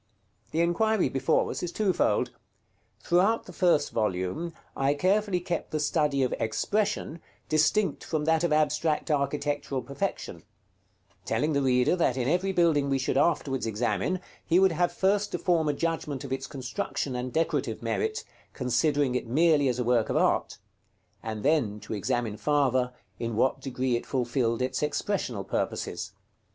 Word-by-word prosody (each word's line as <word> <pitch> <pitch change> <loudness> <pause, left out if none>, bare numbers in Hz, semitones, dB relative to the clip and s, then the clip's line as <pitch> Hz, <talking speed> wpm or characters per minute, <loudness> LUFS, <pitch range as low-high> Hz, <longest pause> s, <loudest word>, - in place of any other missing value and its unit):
The 165 - 0
inquiry 185 +1 +2
before 135 +5 +1
us - - -4
is 175 - -3
twofold. 195 0 +1 0.7
Throughout 190 +6 +2
the 180 - -11
first 165 -4 +2
volume, 105 - -1 0.2
I 135 +1 +1
carefully 195 +3 +1
kept 175 -1 -3
the 155 - -2
study 145 -2 +1
of 125 - 0
expression 170 - -1 0.3
distinct 155 +3 +2
from 155 -2 -2
that 160 +1 +2
of 170 - +1
abstract 155 +1 +1
architectural 145 -2 -1
perfection; 140 +3 -4 0.8
telling 145 +11 0
the 140 - +2
reader 125 +3 +3
that 150 -8 +1
in 125 -1 0
every 180 +5 +1
building 165 -6 +2
we 135 - +2
should 130 - -1
afterwards 135 -4 +1
examine, 110 - -1 0.2
he 170 - +2
would 190 0 +5
have 175 +2 +1
first 205 +2 +1
to - - +1
form 170 -4 +1
a - - +2
judgment 150 -3 -2
of 135 -1 -4
its 135 0 -4
construction 130 0 -4
and 125 +1 -3
decorative 165 +4 -1
merit, 440 +1 -1 0.3
considering 135 +2 +1
it 125 - -2
merely 150 +2 +3
as 125 -2 0
a 125 - 0
work 120 -2 +2
of - - +1
art; - - +1 0.6
and 110 -1 -5
then 135 -9 +1
to 105 +1 -7
examine 115 0 -1
farther, 130 0 +1 0.3
in 115 -1 -3
what 130 +4 +1
degree 130 -2 -1
it 120 - -4
fulfilled 120 -2 0
its 130 0 -2
expressional 150 - -1
purposes. - - -3
145 Hz, 160 wpm, -27 LUFS, 125-170 Hz, 0.8 s, would